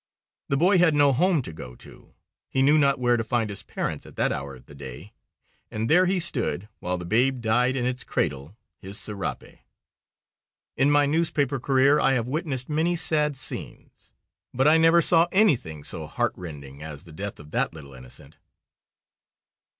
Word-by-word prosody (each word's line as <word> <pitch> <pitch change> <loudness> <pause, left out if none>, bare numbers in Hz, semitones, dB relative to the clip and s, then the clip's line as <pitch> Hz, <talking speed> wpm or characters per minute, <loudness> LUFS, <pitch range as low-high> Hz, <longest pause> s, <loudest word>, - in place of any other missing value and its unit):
The 140 - +1
boy 180 +5 +4
had 165 -3 +4
no 145 -1 +4
home 165 +1 +2
to 80 - -8
go 60 -5 -10
to, - - -16 0.3
he 130 - +1
knew 150 +3 +5
not 140 -2 +3
where 120 -1 +2
to 115 - -1
find 115 -2 -1
his 100 - -7
parents - - -4
at - - -14
that - - +1
hour 70 0 -5
of 65 0 -17
the 70 - -15
day, 70 -3 -10 0.6
and 110 +1 -3
there 180 +6 +4
he 185 0 +1
stood, 125 - -2
while 90 +1 -2
the 90 - -7
babe 125 +7 +1
died 120 +3 +1
in 125 -2 -1
its 125 0 -2
cradle, 75 +5 -3 0.2
his 95 +2 -8
serape. 100 +1 -6 1.2
In 135 +2 +3
my 145 0 +4
newspaper 145 -3 0
career 135 +3 +3
I 135 - +3
have 120 -2 -1
witnessed 135 -2 -2
many 160 +3 0
sad 150 -3 +1
scenes, - - -8 0.4
but 135 +3 +3
I 155 +2 +6
never 165 +1 +5
saw 170 0 +4
anything 125 - +2
so 80 -1 -6
heartrending 75 -4 -5
as 75 -1 -8
the 85 -4 -14
death 100 +5 -6
of 75 +1 -13
that - - 0
little 70 -4 -12
innocent." 65 -1 -13
125 Hz, 180 wpm, -25 LUFS, -, 1.2 s, I